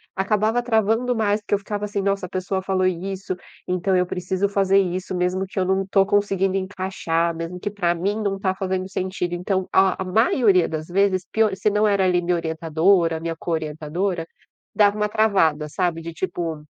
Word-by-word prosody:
acabava 215 +4 +1
travando 225 +1 +1
mais, 210 -1 +1
porque 205 - -5
eu 200 - +3
ficava, 205 0 -4
assim: 205 -1 -2
"Nossa, 195 -1 0
a 180 - -9
pessoa 190 0 -2
falou 190 -1 0
isso, 185 +1 -3 0.3
então 185 +1 0
eu 180 0 +2
preciso 185 +2 -1
fazer 195 -1 +3
isso, 185 0 -2
mesmo 180 +2 0
que 195 +1 -5
eu 185 - +1
não 190 +1 +1
tô 195 0 +3
conseguindo 195 -1 +1
encaixar, 185 -3 -2
mesmo 165 +2 -5
que 205 - -3
para 180 -4 0
mim 195 +5 -1
não 195 -1 -1
tá 190 -1 0
fazendo 185 0 -2
sentido". 185 -2 -3
Então 185 +2 -1
o - - -15
a 190 0 +3
maioria 200 -1 +3
das 155 0 -5
vezes, 185 0 +1
pio 220 -3 +2
se 190 +2 +1
não 210 +1 +2
era 200 -2 +2
ali 180 -1 +2
minha 180 0 +1
orientadora, 165 +1 +1
minha 165 0 -4
co-orientadora, 165 +2 -2 0.5
dava 205 0 +3
uma 210 0 +1
travada, 190 -9 +2
sabe, 170 0 -1
de 165 +1 -6
tipo 165 -3 -4
190 Hz, 190 wpm, -22 LUFS, 175-200 Hz, 0.5 s, eu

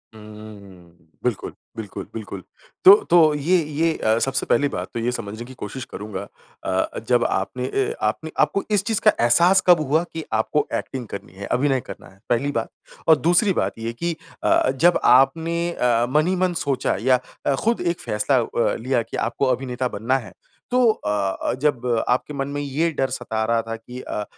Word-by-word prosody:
हुँ, 110 - -12
हूँ, 105 -1 -11
हूँ। 90 -4 -18 0.2
बिल्कुल, 125 -5 -2 0.2
बिल्कुल, 105 -3 -7
बिल्कुल। 100 -4 -7 0.4
तो 195 - +12 0.2
तो 165 -3 +6
ये 160 +6 +2
ये 155 +2 0
अ, 110 +1 +2
सबसे 135 +3 0
पहली 145 - +2
बात 90 -5 -4
तो 115 - -3
ये 120 +2 0
समझने 110 0 -6
कि 130 - -11
कोशिश 125 +3 -7
करूँगा 105 -2 -6 0.4
अ, 95 0 -1
जब 120 -1 +4
आपने 125 +7 -2
अ, 135 0 -1
आपने 155 +9 -2
आपको 150 +7 +2
इस 200 -2 +2
चीज़ 220 -1 -1
का - - +9
एहसास 170 +11 +5
कब 175 -2 +7
हुआ 160 +4 +2
कि 160 - -4
आपको 110 +7 +1
एक्टिंग 125 -3 -4
करनी 100 - -8
है? 100 +1 -8
अभिनय 135 +3 +1
करना - - -9
है 95 - -22
पहली 130 +4 +1
बात। - - -5 0.4
और 160 -1 +7
दूसरी 175 +6 +3
बात - - -4
ये 115 +1 -4
कि 170 +6 -3 0.3
अ, - - +3
जब 170 +6 +3
आपने 165 +6 +4
अ - - -5 0.2
अ, 120 - +2
मन 150 +4 +2
ही 185 - +1
मन 185 -1 +1
सोचा 135 -2 0
या 130 +1 +3 0.3
अ, 140 - +2
खुद 230 - 0
एक 170 -1 -1
फैसला 105 +6 0
अ, 115 0 0
लिया 125 +1 0
कि 115 - -7
आपको 120 +4 -1
अभिनेता 125 0 -3
बनना 120 +4 0
है, 120 -5 -9 0.4
तो 250 -2 +4
अ 105 - -5 0.4
अ, - - +1
जब 140 -5 0 0.2
आपके 130 +4 0
मन 135 -1 -3
में 145 0 -4
ये 145 +4 0
डर 135 0 +1
सता 110 -4 -3
रहा 115 0 +1
था 115 0 -5
कि 125 +3 -10
अ, 105 - -4
130 Hz, 200 wpm, -22 LUFS, 115-155 Hz, 0.4 s, तो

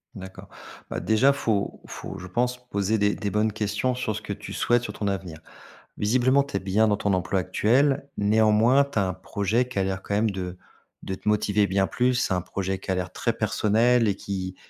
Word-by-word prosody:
D'accord, 95 -1 -10 0.4
bah, - - -3
déjà 110 +6 +3
faut 110 -7 -1
faut, - - -8
je 90 - -8
pense, 125 +6 0
poser 100 +2 0
des 105 0 +2
des 100 - -3
bonnes 105 +2 +1
questions 105 +4 -1
sur 120 -4 -2
ce 105 - -5
que 105 - -5
tu - - -9
souhaites, 120 0 +2
sur - - -5
ton 105 - -3
avenir. 95 -5 -4 0.6
Visiblement 130 +6 +3
tu 140 - -9
es - - -1
bien 100 +4 +2
dans 105 - +3
ton 100 -1 0
emploi 95 +1 0
actuel, 130 +10 +2
néanmoins, 110 +6 +4
tu 140 - -7
as 95 - +1
un 90 - -2
projet 100 +5 -1
qui 125 -5 -3
a - - +2
l'air 95 0 -2
quand 100 - -3
même 110 +1 +2
de 90 -2 -5 0.5
de 95 - -4
te - - -12
motiver 105 -1 +2
bien 95 0 +1
plus, 125 0 +1
un 90 -1 +1
projet 95 +2 -3
qui 95 - -4
a - - +1
l'air 90 -1 -3
très - - -1
personnel 115 +2 +2
et 100 - +1
qui 95 -2 -5
105 Hz, 215 wpm, -25 LUFS, 95-115 Hz, 0.6 s, néanmoins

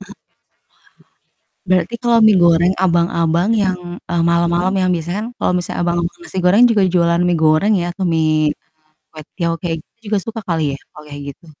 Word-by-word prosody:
Heeh, - - -13 1.3
wah, - - -39
berarti 185 +6 +1
kalau 235 -1 +3
mie 215 -2 +5
goreng 170 +2 +4
abang-abang 170 +1 +1
yang, 185 -2 -1 0.3
eee, 170 -1 0
malam-malam 170 +2 +1
yang 185 - +1
biasanya 175 +3 -3
kan - - -5
kalau - - 0
misalnya 175 - -4
abang 175 0 0
tukang 180 - -6
nasi 190 - -9
goreng 200 +7 +5
juga 205 -3 +2
jualan 170 0 +2
mie 175 -2 +1
goreng 155 +8 +3
ya 175 - -3
kayak 190 -2 -2
mie, 155 -1 +1
eee, 160 - -14 0.4
kwetiau 165 +2 -4
kayak 165 -2 -2
gitu - - -56
juga 210 -1 +1
suka 225 0 -5
kali 165 -2 0
ya, - - -9
kalau 150 - -13
kayak 145 0 -8
gitu? 170 - -24
175 Hz, 190 wpm, -17 LUFS, 165-190 Hz, 1.3 s, mie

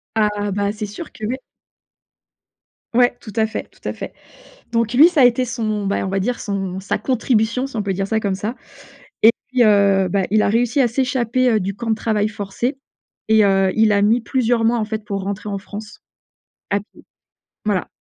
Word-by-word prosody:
Ah, 210 -1 0
bah 200 +1 0
c'est 215 0 -5
sûr 255 +11 -8
que, 215 - -7
ouais. 255 +4 -2 1.6
Ouais, 245 0 +4
tout 215 - -9
à 220 -1 +3
fait, 220 - -5
tout - - -11
à - - -2
fait. - - -7 0.6
Donc 230 0 0
lui 305 +7 +8
ça 310 -7 +3
a - - +8
été 245 +1 +4
son, 215 -4 -2
ben, 200 - 0
on - - -2
va 195 0 -1
dire 245 +5 -1
son, 195 -3 -3
sa 195 +1 -2
contribution 240 +1 0
si 270 - -13
on 210 - 0
peut 195 -1 -1
dire 195 +1 -2
ça 220 +1 0
comme 195 -2 -1
ça 215 +5 -3 0.7
et 225 - +8 0.2
puis, 250 -2 +4
heu, 200 -3 +4
bah, 195 +1 +1
il 215 0 +4
a - - +2
réussi 240 +4 +1
à 245 - +4
s'échapper, 255 0 +1
heu, 215 - +3
du 195 +2 -2
camp 235 +1 -5
de 220 - +3
travail 215 -1 0
forcé 215 +6 -3 0.5
et, 220 -1 +6
heu, 195 -1 +3
il 220 -1 +4
a 200 - +3
mis 225 +4 +4
plusieurs 235 -1 +1
mois, 235 +1 +3
en 220 - 0
fait, 215 -1 -5
pour 200 -2 -3
rentrer 200 +1 -4
en 200 - -2
France. 210 +2 -10 0.7
À 200 - +1
pied. 210 - -20 0.6
Voilà. 200 -4 0
215 Hz, 215 wpm, -20 LUFS, 200-240 Hz, 1.6 s, lui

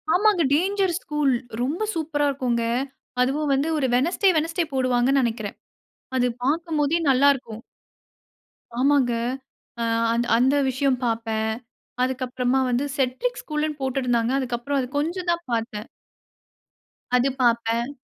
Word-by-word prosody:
ஆமாங்க. 410 -2 +3
Dangers 380 +2 +1
school 295 -3 +1 0.3
ரொம்ப 295 +11 -1
சூப்பர்ரா 295 -2 0
இருக்கும். 255 -3 -1 0.6
அதுவும் 280 +3 +1
வந்து 275 +4 +1
ஒரு 275 - +1
வெட்னஸ்டே, 345 +9 +3
வெட்னஸ்டே 330 +2 0
போடுவாங்கன்னு 255 +1 +2
நினைக்கிறேன். 225 -3 -3 0.6
அது 250 -1 +3 0.2
பார்க்கும் 320 +2 0
போதே 300 +4 +2
நல்லா 270 +2 +5
இருக்கும். 230 -3 -8 1.2
ஆமாங்க. 275 -2 +3 1.3
அந்த 265 +4 +3
விஷயம் 260 0 +1
பார்ப்பேன். 225 -1 -1 0.5
அதுக்கு 260 0 0
அப்புறமா 250 +1 0
வந்து 250 +4 +1
"செட்ரிக் 275 - -1
ஸ்கூல்ன்னு" 300 -1 -3
போட்டிருந்தாங்க. 250 -3 0
அதுக்கு 245 -2 -2
அப்புறம் 280 +3 -1
அது 250 - -2
கொஞ்சம் 345 +4 -2
தான் 340 0 -2
பார்த்தேன். 225 -2 -3 1.3
அது 250 +2 +3
பார்ப்பேன். 235 +1 +1
270 Hz, 120 wpm, -24 LUFS, 245-305 Hz, 1.3 s, நல்லா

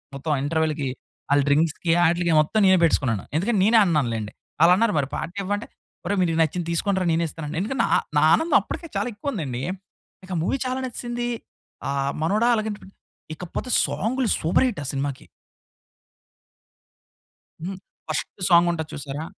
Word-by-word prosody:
మొత్తం 140 +4 -5
ఆ - - -1
ఇంటర్వల్‌కి 155 -1 0 0.4
ఆళ్ల 145 0 +5
డ్రింక్స్‌కి, 155 +3 +2
ఆటిలికి 170 0 +2
మొత్తం 155 +8 0
నేనే 190 0 +6
పెట్టేసుకున్నాను. 125 - +2
ఎందుకంటే 205 +5 +1
నేనే 225 +3 +6
అన్నాను 150 -8 +1
లెండి. 110 -1 -5 0.3
ఆళ్ళన్నారు 190 +6 +5
మరి 140 -1 -2
పార్టీ 175 +5 -6
ఇవ్వా? 200 +2 0
అంటే 220 - -8 0.4
ఒరేయ్ 200 -1 0
మీకు 165 -3 +1
నచ్చింది 165 +2 -2
తీసుకోండిరా 190 +2 0
నేనే 165 +1 +1
ఇస్తానని. 155 0 -6
ఎందుకంటే 255 +7 -3
నా, - - +1 0.3
నా - - +5
ఆనందం 325 +1 +3
అప్పటికే 335 - -6
చాలా - - 0
ఎక్కువ 225 +8 -4
ఉంది 195 -8 -3
అండి. 125 0 -4 0.6
ఇంకా 185 -1 -5
మూవీ 270 +10 0
చాలా 255 +1 -2
నచేసింది 240 0 -4 0.6
ఆహ్, 140 0 0
మనోడ 205 +8 +1
అలాగే.ఇకపోతే 205 -3 -7 0.2
సాంగ్‌లు 250 +4 -1
సూపర్ 165 +11 +3
హిట్ 215 -10 -3
ఆ - - -7
సినిమాకి. 140 -1 -3 2.4
హ్మ్, 190 +2 -4 0.3
ఫస్ట్ 155 -3 -2 0.2
సాంగ్ 170 -1 +6
ఉంటది 160 -2 -4
చూసారా? 145 +2 -5
170 Hz, 155 wpm, -24 LUFS, 150-205 Hz, 2.4 s, నేనే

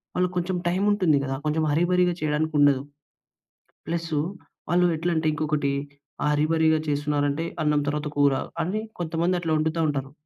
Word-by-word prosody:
వాళ్ళకి 180 0 0
కొంచెం 180 +1 -1
టైం 180 +2 0
ఉంటుంది 180 -8 +3
గదా! 135 0 -2
కొంచెం 155 +1 +1
హర్రీ 165 +4 +2
బరిగా 180 -1 +3
చేయడానికి 155 +1 0
ఉండదు. 140 -2 +4 1.0
ప్లసు 165 -2 -1 0.5
వాళ్ళు 180 +1 +3
ఎట్లంటే 165 -1 0
ఇంకొకటి 150 -2 0 0.6
హర్రీ 150 +1 +2
బరిగా 160 -1 +3
చేస్తున్నారంటే, 145 +1 0 0.2
అన్నం 150 -1 +2
తర్వాత 150 0 -2
కూర 140 -1 +5 0.3
అని 195 +6 -2 0.2
కొంతమంది 170 +2 0
అట్లా 165 -2 -1
వండుతా 160 +2 0
ఉంటారు. 135 -2 -3
155 Hz, 145 wpm, -25 LUFS, 145-170 Hz, 1.0 s, కూర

